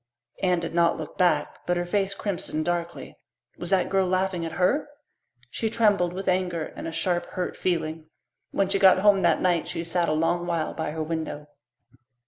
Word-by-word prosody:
Anne 180 -2 +2
did 165 -1 -5
not 170 0 +3
look 155 - -7
back, 180 -1 +1
but 175 0 +1
her 175 - -1
face 195 +1 0
crimsoned 175 -6 -3
darkly. 170 -1 -3 0.4
Was - - -3
that 190 -2 +3
girl 190 -1 +1
laughing 185 -1 0
at 165 - -4
her? 260 +12 +1 0.6
She 225 - -1
trembled 205 -6 +2
with 190 +2 -6
anger 180 -3 0
and - - -6
a - - -4
sharp, 175 +1 0
hurt 180 -1 -4
feeling. 160 -3 -2 0.4
When 195 - +1
she 195 +1 +1
got 190 -1 +7
home 200 0 +4
that - - +3
night 175 -3 +1
she 165 - -3
sat 170 0 0
a - - +2
long 175 +2 0
while 165 -2 -1
by 160 - -3
her 155 +1 -3
window. 155 -2 -4
175 Hz, 190 wpm, -26 LUFS, 165-190 Hz, 0.6 s, got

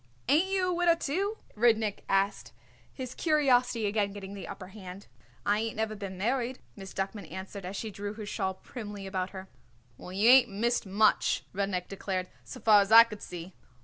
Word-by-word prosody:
"Ain't 305 +8 +4
you 380 -1 +1
a - - +1
widder, 345 -1 +4
too?" 385 +8 -2 0.2
Rudnik 220 -2 +2
asked, 195 +1 0 0.4
his 255 -2 -7
curiosity 250 -7 +2
again 205 -1 0
getting 200 -1 -8
the 200 - -7
upper 185 -2 -8
hand. 195 -1 -10 0.4
"I 205 +1 +2
ain't 225 0 -2
never 220 0 -2
been 195 -2 -7
married," 245 +5 -1 0.2
Miss 195 -2 -9
Duckman 195 -3 -4
answered 190 +1 -7
as 190 +2 -5
she 220 +1 -4
drew 205 +1 -5
her 215 -1 -7
shawl 190 -2 -2
primly 205 -3 -8
about 190 -1 -2
her. 190 -1 -9 0.5
"Well, 180 - -9
you 200 +4 +2
ain't 255 0 +8
missed 225 +2 0
much," 210 +3 +2
Rudnik 195 -2 -2
declared, 190 -2 -3
"so 120 - -9
far 210 -2 +7
as 200 +1 -2
I 230 +1 +11
could 210 -3 -10
see." 180 +1 -8
205 Hz, 185 wpm, -29 LUFS, 195-235 Hz, 0.5 s, I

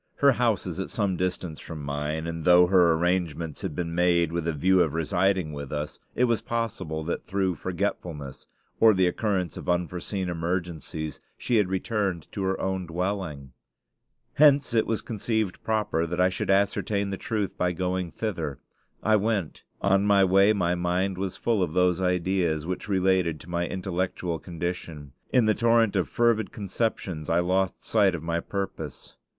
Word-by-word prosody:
Her 140 -1 +5
house 120 -6 +1
is 90 0 -5
at 95 - -3
some 100 -4 0
distance 90 -3 -3
from 80 -3 -7
mine, 75 +3 -3
and 80 -1 -4
though 90 +1 +7
her 90 -2 +5
arrangements 85 -2 -1
had 95 -7 -4
been 85 -2 -3
made 85 -1 +3
with 85 -1 -2
a - - +2
view 90 +5 +3
of 80 -3 +1
residing 90 0 +1
with 70 -2 -6
us, 75 0 -4 0.2
it 125 - +2
was 120 -3 +2
possible 95 -9 -3
that 85 - -3
through 95 -2 0
forgetfulness, 85 -6 -4 0.3
or 110 -2 +6
the 95 0 +3
occurrence 90 -2 -1
of - - -6
unforeseen 90 +2 -1
emergencies, 85 -3 -3 0.2
she 120 - +1
had 100 -4 +2
returned 95 -3 -1
to 100 - -4
her 95 0 0
own 95 -2 -2
dwelling. 85 -6 -3 0.8
Hence 145 -3 +5
it 115 - +2
was 110 - -1
conceived 110 -3 -2
proper 105 -7 0
that 85 +2 -3
I 90 +1 +5
should 95 - -4
ascertain 100 0 +1
the - - -1
truth 105 -1 -2
by 90 0 +1
going 90 0 -2
thither. 80 - -3 0.5
I 110 0 +4
went. 105 -5 -1 0.2
On 100 0 +3
my 100 -1 +5
way 100 +2 +5
my 90 -5 +1
mind 90 +2 -1
was 95 -1 -3
full 115 -4 +1
of 85 -4 -1
those 90 0 +3
ideas 90 -3 0
which 90 +3 -4
related 95 -4 +2
to 85 - -13
my 85 0 0
intellectual 90 -2 -2
condition. 85 -4 -5 0.2
In 125 -3 +4
the 110 - +4
torrent 115 -2 +3
of 95 - +1
fervid 115 -3 +2
conceptions 100 -6 -3
I 85 +1 +3
lost 95 +1 0
sight 100 -5 +3
of 80 - -6
my 85 0 -1
purpose. 100 +2 -6
90 Hz, 175 wpm, -26 LUFS, 85-100 Hz, 0.8 s, though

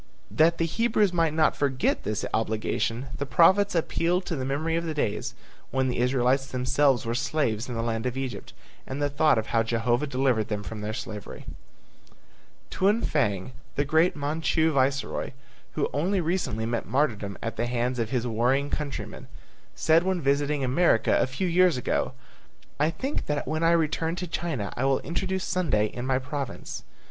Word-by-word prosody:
That 165 +2 +4
the 165 - +1
Hebrews 215 +1 +1
might 165 -2 +2
not 155 0 +2
forget 135 -2 0
this 105 0 -2
obligation, 115 +3 -1
the 140 - -1
prophets 185 +8 +4
appealed 175 +2 +1
to 165 - -2
the 130 - -3
memory 150 +5 -1
of 170 - 0
the 160 -2 -3
days 110 -8 -2 0.3
when 130 -1 0
the 125 - -2
Israelites 130 +2 +2
themselves 130 0 +2
were 115 - -1
slaves 125 -3 -1
in 120 - -4
the 115 - -2
land 115 +1 -1
of 125 +1 -3
Egypt 135 -2 -5 0.4
and 135 +2 -4
the 145 0 0
thought 150 -1 +3
of 110 - 0
how 115 - +4
Jehovah 120 +4 0
delivered 125 -5 +1
them 105 -2 -3
from 110 0 -6
their 105 +1 -3
slavery. 105 -4 -7 1.3
Tuan 205 +4 +2
Fang, 105 -8 0 0.2
the 145 - +1
great 160 +5 +3
Manchu 160 +2 +1
viceroy 135 -1 0 0.4
who 150 - 0
only 185 +7 +1
recently 165 - -1
met 115 0 -2
martyrdom 110 -7 0
at 115 -1 -3
the 120 - -1
hands 125 +1 -1
of 115 -2 -1
his 125 -1 -1
warring 125 +5 +1
countrymen, 145 -2 -5 0.5
said 160 +1 +4
when 185 0 0
visiting 140 0 +1
America 130 -1 +3
a - - +2
few 130 +9 -3
years 180 -3 +4
ago, 125 - -1 0.7
"I 150 +2 +3
think 260 - -3
that 150 -2 -2
when 155 +3 -1
I 165 - +4
return 165 0 +1
to 180 +1 -4
China 155 - -3
I 125 - -2
will 135 -1 +3
introduce 190 +2 -2
Sunday 160 - +1
in 120 +4 -5
my 130 -1 +2
province." 135 0 -5
140 Hz, 175 wpm, -26 LUFS, 120-160 Hz, 1.3 s, That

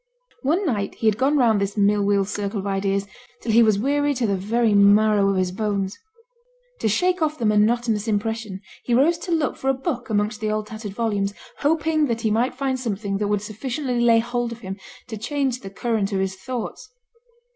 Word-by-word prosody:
One 330 +9 +1
night 210 - -1
he - - -5
had 215 0 +3
gone 280 +3 +3
round 225 -6 +3
this 200 +1 -2
mill 205 0 +3
wheel 200 -1 +2
circle 205 +1 -3
of 195 - -5
ideas 195 0 0 0.3
till 230 - -2
he 230 +2 +6
was 215 -3 +4
weary 285 +5 +1
to 245 -2 0
the 200 -2 +1
very 220 +4 +1
marrow 205 0 +5
of 195 - +1
his 185 -1 0
bones. 200 0 -2 0.8
To - - 0
shake 360 - +1
off 310 -1 0
the 235 - -2
monotonous 215 +1 +2
impression 215 -2 -2 0.2
he 240 - +1
rose 325 +7 +3
to 350 - -6
look 315 -5 0
for 270 - -1
a 270 - +2
book 260 -3 -4
amongst 215 +1 -1
the 215 - -1
old 215 0 -1
tattered 215 -2 -7
volumes, 205 -3 -1 0.2
hoping 310 0 +1
that 230 -2 -2
he 220 - +1
might 240 +5 +1
find 265 -1 -1
something 200 -4 -3
that 210 - 0
would 205 0 0
sufficiently 245 +4 -3
lay 235 -1 +5
hold 240 +1 -1
of 235 0 -8
him 190 -1 -6 0.3
to 220 - -6
change 260 +2 -1
the 195 - -8
current 215 0 -1
of 195 - 0
his 190 0 -1
thoughts. 250 - -6
220 Hz, 210 wpm, -23 LUFS, 205-255 Hz, 0.8 s, he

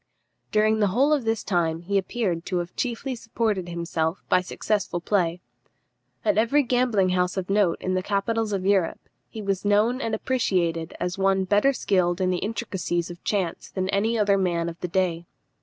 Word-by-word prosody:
During 215 +1 +3
the 205 - +3
whole 265 +10 +3
of 280 -6 0
this 225 -1 0
time 165 -3 0
he 195 +3 +1
appears 190 -4 -2
to 185 - -1
have 175 0 -4
chiefly 255 +2 -2
supported 225 -6 -2
himself 170 0 -2
by 180 - +4
successful 195 0 -2
play. 175 -2 0 0.8
At 310 -7 +3
every 275 +6 +3
gambling 240 -6 +2
house 180 +1 0
of 190 0 -2
note 200 -4 +2
in 185 - -2
the 185 - +1
capitals 210 +3 -1
of 190 -2 -2
Europe 195 -4 +1 0.2
he 220 - -7
was 195 -2 -1
known 215 +5 +2
and 225 -3 -1
appreciated 175 -10 0
as 180 +2 -3
one 195 0 +3
better 205 +8 +3
skilled 185 -8 +1
in 185 -1 +1
the 180 - 0
intricacies 190 -6 -2
of 175 - -12
chance 190 -5 -2
than 185 0 -3
any 215 +4 +1
other 200 -2 +3
man 170 -2 0
of 165 - -10
the 180 - -3
day. 175 -2 -1
195 Hz, 185 wpm, -25 LUFS, 175-220 Hz, 0.8 s, by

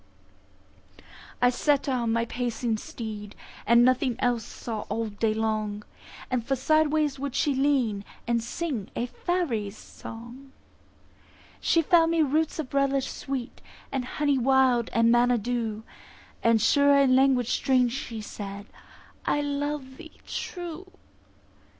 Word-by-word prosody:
I 245 - +6
set 285 +2 +1
her 270 - 0
on 235 -3 0
my 230 0 +1
pacing 235 -1 -2
steed, 210 -3 -7 0.3
And 235 +2 +6
nothing 255 -1 +2
else 245 -3 0
saw 225 0 -6
all 220 +2 -2
day 215 +2 0
long; 215 -1 -1 0.6
For 270 +4 0
sideways 305 +1 +2
would 280 -2 -4
she 290 - +2
lean, 260 -7 +1 0.2
and 235 -1 0
sing 250 - -4
A 240 - -1
faery's 240 - -2
song. 240 +4 -11 1.1
She 330 - +2
found 330 +1 +4
me 330 -1 +3
roots 310 +2 0
of 300 -5 -5
relish 275 -1 +1
sweet, 270 -3 -5 0.3
And 270 -2 -1
honey 285 +1 0
wild, 255 -2 +3
and 230 0 +4
manna 240 +1 +4
dew; 225 -1 -2 0.6
And 230 -1 +4
sure 280 +5 +4
in 270 -2 +5
language 260 -3 +3
strange 255 -2 +2
she 235 -5 -5
said, 200 -1 -7 0.6
"I 290 - +2
love 285 -2 -3
thee 320 - -13
true." 350 0 -6
250 Hz, 130 wpm, -27 LUFS, 230-280 Hz, 1.1 s, I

